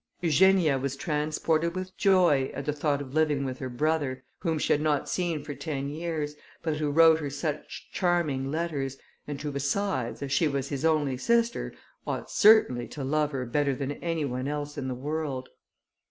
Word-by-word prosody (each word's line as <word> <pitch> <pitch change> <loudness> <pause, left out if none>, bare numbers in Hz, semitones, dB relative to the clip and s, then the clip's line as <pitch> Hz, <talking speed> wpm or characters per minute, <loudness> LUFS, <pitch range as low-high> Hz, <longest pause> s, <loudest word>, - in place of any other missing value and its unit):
Eugenia 170 -3 +4
was 135 +1 -2
transported 155 +3 0
with 185 0 -5
joy, 175 -9 +4
at 140 - -5
the 150 - 0
thought 145 -1 0
of 130 -1 -11
living 150 -3 +2
with 130 -1 -4
her 130 - -4
brother, 140 -1 -1 0.2
whom 165 -3 0
she - - +2
had 145 - +1
not 150 -2 +1
seen 170 -5 -1
for 145 0 -5
ten 140 -1 -4
years, 155 -1 -3 0.3
but 160 -2 -1
who 150 -1 0
wrote 160 +1 +6
her 145 -2 -3
such 150 +1 -4
charming 160 -7 0
letters, 145 -4 -2 0.3
and 145 -1 -4
who 150 - -2
besides, 140 -2 -1
as 140 - -5
she 160 +3 +3
was 140 -2 -2
his 140 -1 -3
only 150 -5 +2
sister, 235 - +1 0.4
ought - - -3
certainly 205 - +5
to 145 - -6
love 150 +2 +1
her 130 -3 -3
better 140 +3 +1
than 135 +1 -3
any 165 +1 -2
one 130 0 -3
else 145 0 -3
in 140 -3 -4
the 130 - -2
world. 145 -1 -3
150 Hz, 185 wpm, -28 LUFS, 140-160 Hz, 0.4 s, wrote